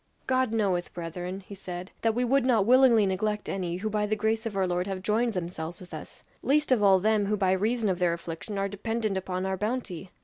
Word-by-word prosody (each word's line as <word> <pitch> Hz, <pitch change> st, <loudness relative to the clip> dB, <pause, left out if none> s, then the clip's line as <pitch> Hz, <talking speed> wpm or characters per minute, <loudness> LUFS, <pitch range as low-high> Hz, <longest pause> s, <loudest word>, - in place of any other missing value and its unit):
"God 260 Hz, -2 st, +1 dB
knoweth, 195 Hz, -6 st, 0 dB
brethren," 180 Hz, +3 st, -5 dB
he 195 Hz, -, -11 dB
said, 185 Hz, -1 st, -7 dB
"that 225 Hz, -1 st, +1 dB
we 250 Hz, +1 st, +1 dB
would 270 Hz, +2 st, +3 dB
not 235 Hz, -6 st, +3 dB
willingly 245 Hz, -3 st, +6 dB
neglect 210 Hz, +2 st, -1 dB
any, 180 Hz, -3 st, -2 dB
who 210 Hz, +4 st, -3 dB
by 210 Hz, 0 st, 0 dB
the 215 Hz, -, +1 dB
grace 220 Hz, +2 st, 0 dB
of 210 Hz, -, -6 dB
our 190 Hz, -1 st, +2 dB
Lord 180 Hz, +1 st, -1 dB
have 190 Hz, -1 st, -4 dB
joined 225 Hz, +3 st, +1 dB
themselves 170 Hz, -2 st, -4 dB
with 180 Hz, -, -12 dB
us; -, -, -9 dB, 0.2 s
least 295 Hz, +1 st, +2 dB
of 245 Hz, -4 st, +4 dB
all 195 Hz, -2 st, +6 dB
them 210 Hz, 0 st, +2 dB
who 210 Hz, +1 st, +1 dB
by 190 Hz, -2 st, +2 dB
reason 215 Hz, +4 st, +1 dB
of 185 Hz, -2 st, 0 dB
their 175 Hz, -2 st, +2 dB
affliction 170 Hz, +3 st, -6 dB
are 195 Hz, 0 st, 0 dB
dependent 215 Hz, +1 st, -2 dB
upon 185 Hz, 0 st, -2 dB
our 190 Hz, 0 st, -1 dB
bounty. 210 Hz, -4 st, -3 dB
200 Hz, 230 wpm, -28 LUFS, 185-225 Hz, 0.2 s, willingly